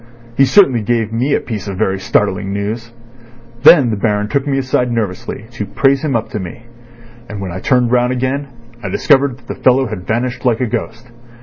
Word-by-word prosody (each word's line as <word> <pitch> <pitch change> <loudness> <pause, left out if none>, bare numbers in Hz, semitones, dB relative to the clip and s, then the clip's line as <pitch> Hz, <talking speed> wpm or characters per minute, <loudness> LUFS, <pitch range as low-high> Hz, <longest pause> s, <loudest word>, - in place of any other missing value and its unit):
He 135 - +5
certainly 135 - +4
gave 115 0 -1
me 130 +5 +1
a - - +1
piece 110 -4 -6
of 95 -2 -5
very 95 -2 0
startling 95 0 0
news. 110 +4 -4 0.7
Then 135 -5 +7
the - - 0
Baron 105 0 -1
took 140 +4 -1
me 135 -1 0
aside 130 -2 0
nervously 110 -2 -4
to 110 -3 -5
praise 135 +6 +2
him 145 -5 0
up 115 -1 -2
to 105 - -3
me, 95 +5 -8 0.7
and 105 - -6
when 95 -2 -5
I 90 - -5
turned 125 +2 +1
round 125 0 +2
again 130 +3 -2 0.4
I - - -3
discovered 140 -3 +2
that 120 -2 -24
the - - -7
fellow 130 +1 +4
had 105 -7 -7
vanished 125 +2 -2
like 120 -3 +1
a 130 - +1
ghost. 115 +1 -5
120 Hz, 205 wpm, -16 LUFS, 105-130 Hz, 0.7 s, Then